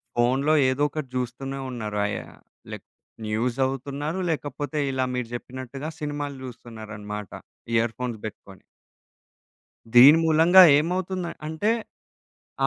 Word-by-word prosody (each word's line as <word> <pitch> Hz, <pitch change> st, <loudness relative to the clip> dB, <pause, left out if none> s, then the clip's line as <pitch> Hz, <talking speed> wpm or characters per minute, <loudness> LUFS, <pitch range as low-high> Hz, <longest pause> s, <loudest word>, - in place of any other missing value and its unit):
ఫోన్లో 130 Hz, +5 st, +2 dB, 0.2 s
ఏదొకటి 145 Hz, +1 st, -1 dB
జూస్తూనే 130 Hz, +2 st, -4 dB
ఉన్నారయా, 105 Hz, -4 st, -3 dB, 0.4 s
lake -, -, -9 dB, 0.4 s
news 115 Hz, +3 st, -1 dB
జదువుతున్నారు, 140 Hz, +5 st, -2 dB
లేకపోతే 145 Hz, -1 st, -3 dB
ఇలా 130 Hz, -1 st, 0 dB
మీరు 125 Hz, -2 st, -2 dB
జెప్పినట్టుగా 130 Hz, +4 st, -6 dB
సినిమాలు 145 Hz, -1 st, -4 dB
జూస్తున్నారనమాట 105 Hz, -4 st, -8 dB, 0.4 s
ఇయర్‌ఫోన్స్ 115 Hz, +1 st, -1 dB
బెట్టుకొని. 100 Hz, -3 st, -10 dB, 1.3 s
దీని 140 Hz, +6 st, +10 dB
మూలంగా 165 Hz, +4 st, +7 dB
ఏమవుతుంద 180 Hz, +3 st, -1 dB, 0.2 s
అంటే, 160 Hz, +8 st, 0 dB, 0.9 s
ఆ -, -, +5 dB
130 Hz, 95 wpm, -25 LUFS, 120-150 Hz, 1.3 s, దీని